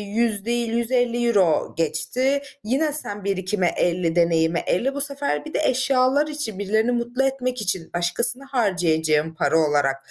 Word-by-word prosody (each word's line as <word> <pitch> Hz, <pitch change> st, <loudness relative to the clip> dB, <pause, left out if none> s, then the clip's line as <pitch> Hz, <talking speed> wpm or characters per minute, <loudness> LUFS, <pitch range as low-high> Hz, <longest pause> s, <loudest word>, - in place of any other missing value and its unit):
100 220 Hz, -3 st, 0 dB
değil, 235 Hz, 0 st, -1 dB
€150 235 Hz, -6 st, +1 dB
geçti. 250 Hz, -, 0 dB, 0.2 s
Yine 280 Hz, +7 st, 0 dB
sen 205 Hz, -9 st, -3 dB
birikime 190 Hz, -1 st, 0 dB
50 175 Hz, -1 st, 0 dB
deneyime 170 Hz, -1 st, +2 dB
50 265 Hz, +9 st, +1 dB
bu 285 Hz, -, -3 dB
sefer 280 Hz, +1 st, -2 dB
bir 310 Hz, -, -9 dB
de -, -, 0 dB
eşyalar 260 Hz, +2 st, +2 dB
için, 295 Hz, -10 st, -5 dB
birilerini 220 Hz, +4 st, +1 dB
mutlu 240 Hz, +2 st, -1 dB
etmek 255 Hz, -2 st, -1 dB
için 185 Hz, -4 st, -2 dB
başkasına 235 Hz, +10 st, -1 dB
harcayacağın 160 Hz, -, +1 dB
para 160 Hz, 0 st, +1 dB
olarak 145 Hz, -3 st, +2 dB
220 Hz, 145 wpm, -23 LUFS, 175-255 Hz, 0.2 s, deneyime